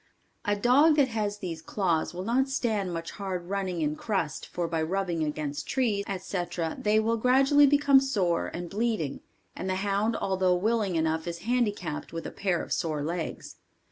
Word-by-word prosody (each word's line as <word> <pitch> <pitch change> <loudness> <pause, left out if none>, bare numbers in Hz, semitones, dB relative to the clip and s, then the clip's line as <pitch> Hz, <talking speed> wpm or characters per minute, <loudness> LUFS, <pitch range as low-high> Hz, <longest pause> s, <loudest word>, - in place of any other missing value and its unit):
A 205 -1 +2
dog 265 +9 +5
that 280 -3 +3
has 210 -3 -2
these 170 -5 -5
claws 170 -2 0
will 180 +1 -5
not 255 +6 +1
stand 220 -8 -1
much 165 -1 -4
hard 185 -3 -5
running 190 -4 -2
in 150 0 0
crust 170 -7 -2
for 175 -1 -3
by 165 -1 -1
rubbing 175 -1 -1
against 150 -1 -3
trees, 220 -6 0
etc., 175 -3 -3
they 215 +1 +3
will 225 +1 +1
gradually 270 +4 +5
become 285 -1 +5
sore 195 -11 0
and 175 0 -5
bleeding, 205 - -1 0.4
and 190 - -4
the 185 - 0
hound 200 +3 0
although 185 -1 +1
willing 210 0 0
enough 160 0 0
is 170 0 -5
handicapped 210 -12 -1
with 165 - -5
a - - -5
pair 185 -4 -1
of - - -3
sore 155 -3 -1
legs. 165 +2 -4
195 Hz, 175 wpm, -28 LUFS, 170-225 Hz, 0.4 s, dog